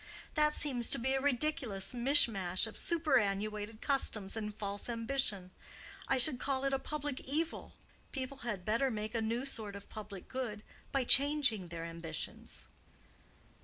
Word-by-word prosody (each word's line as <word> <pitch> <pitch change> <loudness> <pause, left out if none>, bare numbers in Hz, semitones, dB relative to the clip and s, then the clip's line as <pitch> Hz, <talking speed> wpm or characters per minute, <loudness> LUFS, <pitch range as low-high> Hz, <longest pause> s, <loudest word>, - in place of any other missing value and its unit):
That 300 -1 +3
seems 250 -5 +1
to - - +3
be 265 +3 0
a 270 - +1
ridiculous 265 -7 +1
mishmash 235 -8 +3
of 220 - -8
superannuated 215 -8 0
customs 220 -8 +1
and 210 -1 -3
false 205 +1 -4
ambition. 230 -6 -1 0.6
I - - +2
should 255 0 +4
call 270 -1 -1
it 275 0 +1
a 270 - +1
public 290 -1 -3
evil. 315 +5 -3 0.4
People 270 0 -4
had 210 -8 -4
better 230 +5 +2
make 215 -1 -4
a 230 - 0
new 230 +4 -1
sort 215 -7 -4
of 200 - -10
public 205 -3 -8
good 235 -5 -4 0.3
by 270 -1 +1
changing 265 -7 +5
their 165 -1 -6
ambitions." 165 -1 -6
235 Hz, 150 wpm, -34 LUFS, 205-275 Hz, 0.6 s, changing